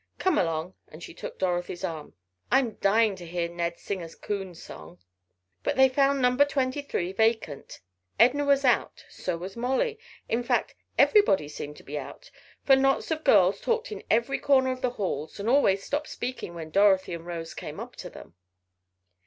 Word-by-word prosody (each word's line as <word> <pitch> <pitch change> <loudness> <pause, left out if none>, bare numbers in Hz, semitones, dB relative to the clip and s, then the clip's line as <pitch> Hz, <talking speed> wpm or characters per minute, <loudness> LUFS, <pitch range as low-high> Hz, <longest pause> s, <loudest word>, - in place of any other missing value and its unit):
Come 375 -4 +2
along," 165 +1 -1
and 155 +2 -12
she - - -9
took - - -8
Dorothy's 175 -1 -2
arm. 160 -5 -5 0.4
"I'm 260 -3 +3
dying 215 +1 +3
to 175 - -9
hear 170 0 -2
Ned 170 0 -3
sing 195 -2 -4
a 165 - -7
coon 195 0 -5
song." 80 - -11 0.6
But - - -1
they 265 0 +6
found 275 +1 +2
number 250 +3 +5
twenty 275 -1 -1
three 185 -10 -3
vacant. 220 -9 -1 0.4
Edna 255 +6 +5
was 280 -1 +3
out, 245 - +1
so 180 -2 -3
was 185 +3 -7
Molly, 265 - -1 0.3
in 230 - 0
fact 245 0 0 0.2
everybody 405 - +4
seemed 150 0 -7
to - - -14
be 145 +1 -5
out, - - -10 0.3
for 270 - +6
knots 270 +3 +1
of 315 0 -2
girls 195 -6 +4
talked 465 +1 -1
in 420 - -6
every 235 +4 +1
corner 260 -2 +3
of 255 0 -5
the 250 - +1
halls 185 - -4
and 200 - -4
always 215 -7 +3
stopped 295 +2 -2
speaking 245 -8 -5
when 160 -2 -7
Dorothy 195 -2 +4
and 170 0 -7
Rose 165 -2 -5
came - - -7
up - - -8
to - - -7
them. - - -13
210 Hz, 185 wpm, -27 LUFS, 175-265 Hz, 0.6 s, they